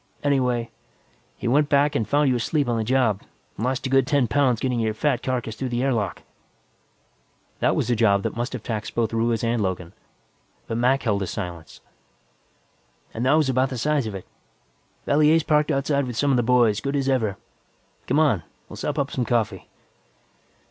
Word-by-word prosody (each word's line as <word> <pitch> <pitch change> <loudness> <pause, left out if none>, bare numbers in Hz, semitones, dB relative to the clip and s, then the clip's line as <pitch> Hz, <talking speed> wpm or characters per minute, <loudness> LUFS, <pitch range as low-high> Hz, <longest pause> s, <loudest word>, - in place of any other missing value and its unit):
Anyway, 125 -5 0 0.7
he - - -4
went 145 +4 +3
back 145 +1 +3
and 110 - -1
found 145 0 +3
you 130 - +2
asleep 140 +4 0
on 120 - 0
the 115 - 0
job, 120 -4 +1 0.3
and 110 - -5
lost 130 +1 -2
a - - -1
good 135 -1 +3
ten 145 -5 +2
pounds 130 -4 +2
getting 125 -1 -1
your 110 -1 -1
fat 140 +1 0
carcass 120 -4 -3
through 130 +2 -4
the 120 +1 -1
air 135 -1 +2
lock." 105 -6 -3 1.4
That - - +2
was - - 0
a - - +3
job 100 -3 +3
that - - -3
must 120 +3 -3
have 125 -4 -6
taxed 110 -2 -4
both 115 -1 0
Ruiz 115 0 0
and 115 -1 0
Logan, 90 -2 -3 0.7
but 115 - -3
Mac 130 +3 +2
held 105 -4 0
his 95 - -3
silence. 85 -5 -7 1.3
"And 115 - -3
that 135 - +4
was 155 -2 +3
about 130 0 +1
the 130 - -5
size 145 0 0
of 105 - -5
it. 95 - -8 0.8
Valier's 155 +2 +4
parked 150 0 +2
outside 140 -1 0
with 120 -2 -6
some 145 +2 +2
of 130 - +3
the - - +3
boys, 120 -3 +3
good 140 +1 -2
as 135 -1 0
ever. 110 -8 0 0.7
Come - - +1
on, 145 - +3 0.3
we'll - - -9
sop - - -3
up 140 0 -1
some 125 - -1
coffee." 110 -6 -1
125 Hz, 195 wpm, -23 LUFS, 110-140 Hz, 1.4 s, that